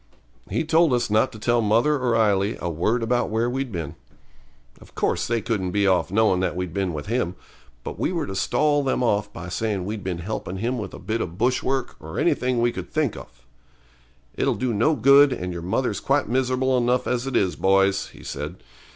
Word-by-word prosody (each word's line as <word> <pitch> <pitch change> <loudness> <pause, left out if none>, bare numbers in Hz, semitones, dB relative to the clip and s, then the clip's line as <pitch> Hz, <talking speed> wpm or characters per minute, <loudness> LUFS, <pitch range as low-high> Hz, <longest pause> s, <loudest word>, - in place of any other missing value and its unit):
He - - 0
told 160 -2 +3
us 120 -3 0
not 110 +4 +3
to - - -10
tell 120 +2 +1
mother 115 +8 +3
or 125 -2 +1
Ailie 105 -2 +2
a 85 - -3
word 110 +9 0
about 120 +2 +1
where 115 +2 0
we'd 130 0 -3
been. 85 -6 -4 0.9
Of - - -18
course - - 0
they 115 -1 0
couldn't 100 -6 -1
be 100 +2 +1
off 95 -2 +2
knowin' 100 -1 +3
that 95 -2 -1
we'd 90 -2 -4
been 95 -2 -1
with 75 -2 -5
him; 110 -5 -1 0.5
but - - -7
we - - 0
were 170 -4 -1
to 95 - -6
stall 145 +9 +2
them 130 -2 0
off 105 -3 +1
by 90 -2 -8
saying 100 0 -2
we'd 105 0 -5
been 90 -2 -3
helping 95 +1 -5
him 120 +5 -2
with 100 -3 -6
a - - -8
bit 110 +5 -2
of 85 0 -5
bush 125 +3 +1
work 135 -1 -2
or - - -8
anything 125 -1 +1
we 120 - +3
could - - -7
think 155 -7 0
off. 65 0 -13 0.9
'It'll - - 0
do 125 -2 -1
no 120 +10 +2
good, 140 +3 +6
and 90 -7 -3
your 85 - -5
mother's 100 +4 -1
quite 140 +1 +1
miserable 130 +2 +1
enough 125 +1 +1
as 125 +1 -1
it 135 - -3
is, 95 -3 +2
boys,' 95 0 +2
he - - -15
said. 75 +2 -6
110 Hz, 215 wpm, -24 LUFS, 95-125 Hz, 0.9 s, good